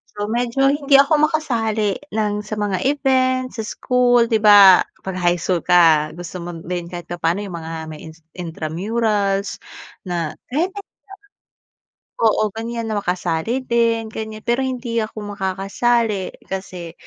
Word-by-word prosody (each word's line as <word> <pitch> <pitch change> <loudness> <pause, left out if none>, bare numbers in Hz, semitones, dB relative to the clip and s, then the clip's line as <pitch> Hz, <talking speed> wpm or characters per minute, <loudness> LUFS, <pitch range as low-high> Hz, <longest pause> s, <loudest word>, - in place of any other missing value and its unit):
So, 205 0 -3
medyo 245 +3 +2
hindi 285 -1 +2
ako 300 +2 +4
makasali 225 -9 -1
ng 210 -1 -1
sa 215 - -5
mga 200 -3 -1
event, 260 -2 +1
sa 220 - -5
school, 245 +1 +2
'di 225 -1 +1
ba 200 -3 +8 0.2
'pag 190 -1 -5
high 175 0 +2
school 175 -2 -1
ka 165 -4 +4
gusto 175 +1 -7
mo 175 - -5
din 175 -1 -4
kahit 175 -1 -7
papaano 175 +1 -1
'yung 190 -4 -6
mga 165 0 -6
may 155 0 -9
in - - -16 0.2
intramurals 195 +5 -2 0.4
na 170 -4 -3 0.2
kahit 340 +7 0
ganito. 405 - -10 1.3
Oo, 215 -1 +3
ganiyan 230 0 -4
na 215 - -2
makasali 180 +6 -1
din 230 -1 +1
ganiyan 220 0 -7
pero 240 +2 +1
hindi 250 -3 -3
ako 215 -1 -6
makakasali 195 +2 0
kasi 180 -3 -6
210 Hz, 145 wpm, -20 LUFS, 180-235 Hz, 1.3 s, ba